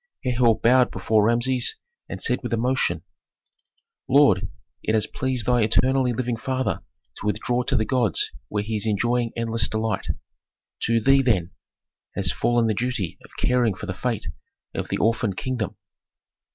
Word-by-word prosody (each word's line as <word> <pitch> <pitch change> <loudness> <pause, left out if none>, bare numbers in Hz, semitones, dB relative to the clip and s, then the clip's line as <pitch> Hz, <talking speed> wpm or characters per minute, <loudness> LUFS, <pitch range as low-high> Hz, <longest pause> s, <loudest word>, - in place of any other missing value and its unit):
Herhor 120 -3 +2
bowed 125 +2 +4
before 110 -1 +1
Rameses, 120 +1 +2 0.3
and - - -5
said - - 0
with - - -4
emotion, 115 -8 0 1.1
"Lord! 135 -9 +5 0.3
it 110 - 0
has 110 - +3
pleased 130 -4 -2
thy 125 -1 +3
eternally 130 +3 +3
living 120 0 -2
father 130 +2 -2 0.4
to - - -8
withdraw 120 +4 0
to - - 0
the 110 - +2
gods 120 - +1 0.2
where 105 -1 -2
he 110 +1 -3
is 105 - -1
enjoying 120 +3 +1
endless 115 -1 +1
delight. 110 -3 -2 0.8
To 115 0 +2
thee, 135 +4 +4
then, 95 -9 +1 0.6
has - - +2
fallen 120 -1 +1
the 110 - +1
duty 115 -5 -2
of - - -15
caring 120 -5 +2
for 100 - -7
the 95 - -3
fate 115 +4 -3 0.5
of - - -3
the - - -1
orphan 110 -2 +1
kingdom. 120 -5 -3
115 Hz, 155 wpm, -24 LUFS, 110-125 Hz, 1.1 s, Lord